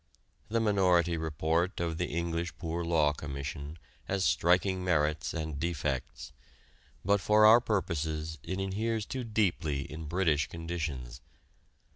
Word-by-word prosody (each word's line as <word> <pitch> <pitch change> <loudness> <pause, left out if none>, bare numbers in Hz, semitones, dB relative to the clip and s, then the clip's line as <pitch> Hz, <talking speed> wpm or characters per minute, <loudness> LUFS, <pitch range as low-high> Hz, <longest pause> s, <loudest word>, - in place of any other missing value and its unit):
The 115 +2 +1
Minority 90 -6 +3
Report 80 +3 -1
of 85 -1 -2
the 90 - 0
English 85 +1 -3
Poor 85 0 -3
Law 80 -3 +2
Commission 70 +1 -6 0.3
has 95 -1 0
striking 90 +2 +2
merits 75 -3 +1
and 80 -3 -4
defects, 75 -5 -3 0.7
but 100 0 +3
for 105 +2 +5
our 115 +3 +8
purposes 80 - -2
it 95 +5 -4
inheres 105 +3 -1
too 130 +2 -4
deeply 95 -10 0
in 75 +3 -7
British 80 -2 +1
conditions. 75 -8 -5
85 Hz, 125 wpm, -30 LUFS, 75-95 Hz, 0.7 s, our